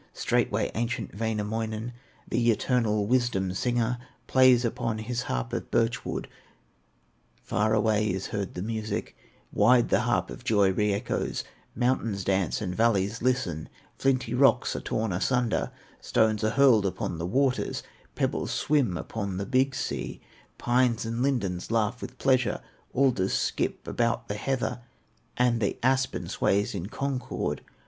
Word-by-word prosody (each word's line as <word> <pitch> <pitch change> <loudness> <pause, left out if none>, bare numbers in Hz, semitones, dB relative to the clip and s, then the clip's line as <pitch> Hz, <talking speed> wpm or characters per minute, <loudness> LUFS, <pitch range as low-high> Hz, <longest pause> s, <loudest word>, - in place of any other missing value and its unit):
Straightway - - 0
ancient 120 +2 -2
Wainamoinen, 110 +1 -2 0.3
The 120 0 +1
eternal 110 -2 +1
wisdom 115 -6 +1
singer, 120 +3 0 0.3
Plays 130 -2 +5
upon 115 -1 -1
his 120 +3 -3
harp 120 0 -2
of 120 - -3
birch 115 0 +1
wood. - - -4 1.2
Far 110 +3 +1
away 105 0 +2
is 95 -1 -2
heard 100 -2 -3
the 90 - -3
music, 110 -1 -3 0.4
Wide 120 +3 +4
the - - +4
harp 100 -7 0
of - - -9
joy 105 -5 +3
re 105 +2 +1
echoes; 100 +4 -2 0.3
Mountains 115 -5 0
dance 95 +1 0
and 90 -4 -2
valleys 110 0 +1
listen, 100 -11 0 0.3
Flinty 130 -3 0
rocks 130 -2 +3
are - - -2
torn 110 -3 -2
asunder, 120 +5 +1 0.3
Stones 110 -1 +1
are 110 - +3
hurled 120 -5 +5
upon 85 -3 -3
the 85 - -2
waters, 130 +5 0 0.3
Pebbles - - -1
swim 135 -12 +1
upon 100 -3 -4
the 100 - -2
Big 130 +4 +2
Sea, - - -3 0.4
Pines 120 -1 +2
and 115 +1 -2
lindens 100 -10 -1
laugh 115 +1 0
with 125 +1 -8
pleasure, 130 -3 +2 0.3
Alders 120 -8 +2
skip - - -1
about 115 -1 0
the - - -1
heather, 125 +2 -2 0.6
And 120 -2 +2
the 100 - 0
aspen 130 0 +1
sways 100 +1 +1
in 95 -2 -4
concord. 135 0 -3
115 Hz, 140 wpm, -27 LUFS, 105-125 Hz, 1.2 s, Plays